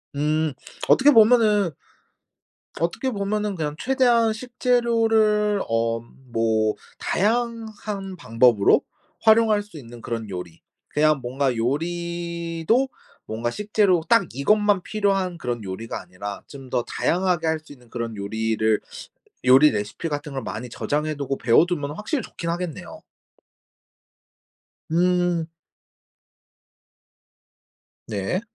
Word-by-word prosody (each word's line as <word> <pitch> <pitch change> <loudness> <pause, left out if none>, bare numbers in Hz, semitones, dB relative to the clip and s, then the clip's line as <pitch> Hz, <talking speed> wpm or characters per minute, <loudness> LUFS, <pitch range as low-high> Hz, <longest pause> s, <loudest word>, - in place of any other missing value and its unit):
음. 155 +1 0 0.3
어떻게 285 +3 +6
보면은 215 - +5 1.1
어떻게 175 +10 -1
보면은 210 -1 -2
그냥 150 -3 -3
최대한 240 -4 +3
식재료를 225 -4 +2
엄 115 +2 -2
뭐 110 -1 +2 0.2
다양한 215 -3 -2
방법으로 115 - +4 0.4
활용할 220 -1 +5
수 205 -5 -13
있는 120 -4 -11
그런 115 -1 -4
요리. 90 -3 -7 0.3
그냥 155 -1 +2
뭔가 130 +1 -1
요리도 170 - -1 0.4
뭔가 115 +2 -2
식재료 205 - +2
딱 230 -4 +5
이것만 205 - +2
필요한 195 -3 0
그런 120 -6 -4
요리가 100 +4 -5
아니라 100 +3 -7
좀 135 -3 -11
더 120 - +1
다양하게 180 -2 0
할 160 0 +1
수 155 - -18
있는 125 -4 -15
그런 115 -2 -4
요리를 110 +1 0 0.6
요리 130 +4 +7
레시피 105 +9 -3
같은 145 -1 -4
걸 135 -1 -4
많이 120 +4 -6
저장해 150 +5 -2
두고 140 -1 -3
배워두면은 145 +4 +2
확실히 250 - -2
좋긴 170 - -6
하겠네요. 170 -2 -5 1.9
음. 175 -1 +2 2.6
네. 105 - -2
165 Hz, 240 characters per minute, -23 LUFS, -, 2.6 s, 요리